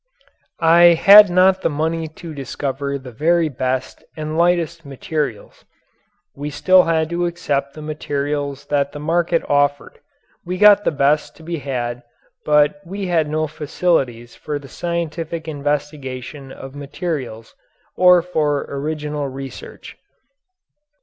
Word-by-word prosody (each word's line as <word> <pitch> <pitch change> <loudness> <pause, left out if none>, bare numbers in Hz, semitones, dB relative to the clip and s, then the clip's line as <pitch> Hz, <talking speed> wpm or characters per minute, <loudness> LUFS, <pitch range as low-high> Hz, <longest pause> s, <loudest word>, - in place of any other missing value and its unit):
I 170 +1 +7
had 205 +3 +9
not 185 +1 +4
the - - +1
money 160 +2 -2
to 160 +1 -10
discover 140 0 -4
the 130 -2 -11
very 160 +6 +1
best 130 -1 -3
and 155 0 -4
lightest 170 -1 +1
materials. 145 - -5 0.7
We 145 +1 -5
still 180 +6 +4
had 160 -1 +1
to 175 0 0
accept 140 -5 -2
the 155 - -9
materials 145 -2 -3
that 140 -1 0
the 145 - -7
market 165 +2 0
offered 145 0 0 0.4
we 180 +1 -4
got 205 +1 +6
the - - +2
best 145 +1 +1
to 160 - -16
be 170 0 -4
had 125 -3 -4 0.4
but 150 +6 +3
we 195 +2 -5
had 165 -4 +1
no 155 +1 0
facilities 145 -6 -2
for 150 -1 -4
the 140 -1 -11
scientific 170 0 -4
investigation 145 -2 -4
of 135 0 -10
materials 140 -6 -5 0.4
or 180 -1 +5
for 150 -5 0
original 150 0 -3
research. 135 0 -9
150 Hz, 130 wpm, -19 LUFS, 140-170 Hz, 0.7 s, had